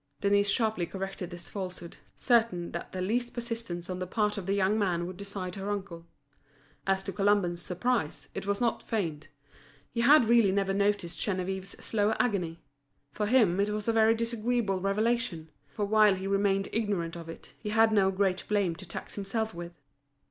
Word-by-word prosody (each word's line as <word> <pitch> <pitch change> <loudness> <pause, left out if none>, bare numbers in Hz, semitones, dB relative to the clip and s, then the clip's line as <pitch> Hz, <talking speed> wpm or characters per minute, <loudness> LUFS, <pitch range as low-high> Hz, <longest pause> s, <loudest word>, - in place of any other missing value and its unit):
Denise 200 0 +3
sharply 215 -5 +1
corrected 195 -1 -5
this 175 -1 -9
falsehood, 185 -3 -6 0.2
certain 225 -8 +2
that - - -6
the 185 - -4
least 240 +5 -1
persistence 230 -8 -4
on 185 -1 -4
the 185 - -3
part 210 +2 +1
of 195 -3 -5
the 195 - +1
young 200 +2 +2
man 175 -4 0
would 185 +1 -6
decide 195 -2 -5
her 195 +1 -4
uncle. 190 -5 -5 0.8
As 195 0 +2
to 195 - -5
Colomban's 195 -4 +2
surprise, 185 -2 -1
it - - -5
was 200 0 0
not 235 -1 +1
feigned; 165 -9 -3 0.6
he 235 - -1
had 280 +1 +7
really 230 -3 +5
never 195 0 +1
noticed 200 -3 0
Geneviève's 190 -1 -3
slow 210 0 +1
agony. 180 -9 -1 0.5
For 210 +7 -2
him 210 -7 +4
it 200 +1 +2
was 210 +1 -3
a 230 - +3
very 225 0 +5
disagreeable 230 -3 0
revelation; 200 -4 0 0.2
for 210 - -2
while 210 -1 +5
he 190 +1 -6
remained 195 0 +1
ignorant 200 -7 -1
of 165 -1 -8
it, 165 - -11
he 210 - -5
had 225 +1 +4
no 200 -3 +4
great 190 -1 0
blame 200 -5 +1
to 190 - -10
tax 170 - -7
himself 215 +2 -2
with. 170 -1 -8
200 Hz, 180 wpm, -29 LUFS, 185-220 Hz, 0.8 s, had